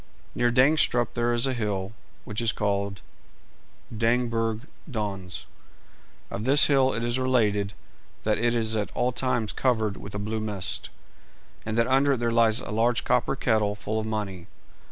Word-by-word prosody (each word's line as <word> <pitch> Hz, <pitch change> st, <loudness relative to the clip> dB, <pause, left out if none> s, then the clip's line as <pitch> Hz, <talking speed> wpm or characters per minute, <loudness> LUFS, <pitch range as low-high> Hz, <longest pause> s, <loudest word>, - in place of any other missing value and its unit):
Near 120 Hz, -, +2 dB
Dangstrup 125 Hz, -2 st, +3 dB
there 120 Hz, 0 st, +1 dB
is 120 Hz, +1 st, +2 dB
a 135 Hz, -, 0 dB
hill 105 Hz, -4 st, -2 dB, 0.3 s
which 110 Hz, -1 st, -3 dB
is 115 Hz, -2 st, +2 dB
called 100 Hz, -2 st, -2 dB, 0.9 s
Dangbjerg 115 Hz, -1 st, +1 dB, 0.3 s
Dons. 100 Hz, -7 st, -4 dB, 0.9 s
Of 105 Hz, -, -4 dB
this 140 Hz, +4 st, +5 dB
hill 135 Hz, -2 st, +4 dB
it 115 Hz, -, -2 dB
is 120 Hz, +2 st, 0 dB
related 105 Hz, -6 st, +1 dB, 0.5 s
that 105 Hz, 0 st, +1 dB
it 120 Hz, 0 st, +2 dB
is 110 Hz, -1 st, 0 dB
at 105 Hz, -2 st, -1 dB
all 125 Hz, -, +1 dB
times 120 Hz, -4 st, -1 dB
covered 110 Hz, -6 st, 0 dB
with 100 Hz, 0 st, -9 dB
a -, -, -1 dB
blue 110 Hz, +2 st, -3 dB
mist, 105 Hz, -4 st, -3 dB, 0.8 s
and 110 Hz, +1 st, -2 dB
that 115 Hz, -, +4 dB
under 135 Hz, +2 st, +3 dB
it -, -, -1 dB
there 120 Hz, 0 st, 0 dB
lies 115 Hz, -1 st, +3 dB
a -, -, -7 dB
large 115 Hz, +3 st, +2 dB
copper 125 Hz, +2 st, +1 dB
kettle 110 Hz, -5 st, +1 dB
full 110 Hz, +1 st, -3 dB
of 110 Hz, -, -3 dB
money. 100 Hz, -5 st, -4 dB
115 Hz, 165 wpm, -26 LUFS, 105-120 Hz, 0.9 s, this